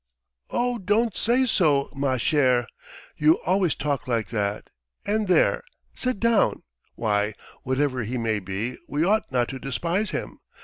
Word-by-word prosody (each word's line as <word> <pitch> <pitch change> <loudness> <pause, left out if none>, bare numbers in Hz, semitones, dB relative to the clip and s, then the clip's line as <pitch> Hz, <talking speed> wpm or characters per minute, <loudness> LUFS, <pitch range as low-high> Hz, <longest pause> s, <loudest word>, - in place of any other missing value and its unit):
"Oh, 245 -1 0
don't 210 +2 +1
say 250 +3 +2
so, 150 - +3
ma 135 -2 0
chère! 125 -2 +2 0.5
You 155 +2 +5
always 185 -1 +2
talk 145 -3 -2
like 115 -3 -1
that; 105 -2 -2 0.3
and 210 +1 0
there... 185 - +3 0.3
sit 255 -5 -2
down! 230 -2 +2 0.3
Why, 105 -1 0 0.3
whatever 130 0 0
he 120 +4 -3
may 110 -2 0
be, 100 +6 -4
we 150 +2 0
ought 215 +4 +1
not 125 -2 +1
to 135 - -6
despise 165 - -1
him. - - -5
140 Hz, 145 wpm, -25 LUFS, 120-200 Hz, 0.5 s, You